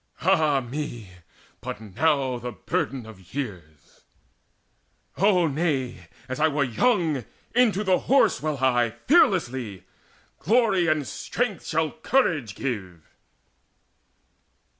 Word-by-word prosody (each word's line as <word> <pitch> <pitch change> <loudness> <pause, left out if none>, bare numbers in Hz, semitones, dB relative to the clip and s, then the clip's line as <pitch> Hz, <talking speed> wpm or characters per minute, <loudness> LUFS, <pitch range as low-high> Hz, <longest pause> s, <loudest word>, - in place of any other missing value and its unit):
Ah 155 -6 +3
me, 120 -5 -6 0.5
but - - -6
now 130 - 0
the 125 +1 -5
burden 120 +4 -3
of 95 -2 -14
years 85 - -7 1.2
O 185 -2 +4
nay, 135 - -2 0.2
As 130 +2 -5
I 160 - +4
were 145 -2 +1
young, 155 - +1 0.3
into 225 -5 +3
the 190 -2 +3
Horse 270 +1 +3
will 155 -1 -1
I 120 -3 +2
Fearlessly! 130 - +2 0.6
Glory 215 -6 +3
and 155 -3 +1
strength 225 -7 -3
shall 160 -1 0
courage 175 - 0
give." 95 - -5
140 Hz, 105 wpm, -25 LUFS, 120-175 Hz, 1.2 s, O